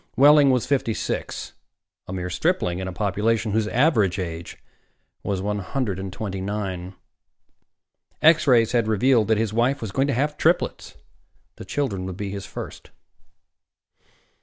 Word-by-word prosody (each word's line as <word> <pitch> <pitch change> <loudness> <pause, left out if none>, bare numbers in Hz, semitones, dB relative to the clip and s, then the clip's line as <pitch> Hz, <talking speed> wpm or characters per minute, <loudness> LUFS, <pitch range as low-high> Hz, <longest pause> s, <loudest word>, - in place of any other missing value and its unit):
Wehling 145 +1 +7
was 125 -3 +2
fifty 130 -6 0
six, - - -4 0.5
a - - -7
mere 90 -1 -4
stripling 90 - 0
in 95 - -4
a - - -4
population 105 +3 0
whose 110 +1 +1
average 110 - +2
age 85 -2 -5 0.6
was 95 -2 -2
one 105 0 -1
hundred 100 -1 -3
and 95 0 -5
twenty 95 0 -5
nine. 95 -2 -4 1.2
X 155 0 +5
rays 115 -4 +5
had 120 -3 +1
revealed 110 +1 +3
that 110 -1 +3
his 110 -1 -1
wife 125 +5 +1
was 110 -4 -5
going 135 +6 +1
to 140 - 0
have 150 +4 -1
triplets. 170 +3 0 0.6
The - - -9
children 100 -10 -2
would 95 -1 -6
be 100 -1 -4
his 100 -1 -6
first. - - -8
110 Hz, 155 wpm, -23 LUFS, 95-130 Hz, 1.2 s, Wehling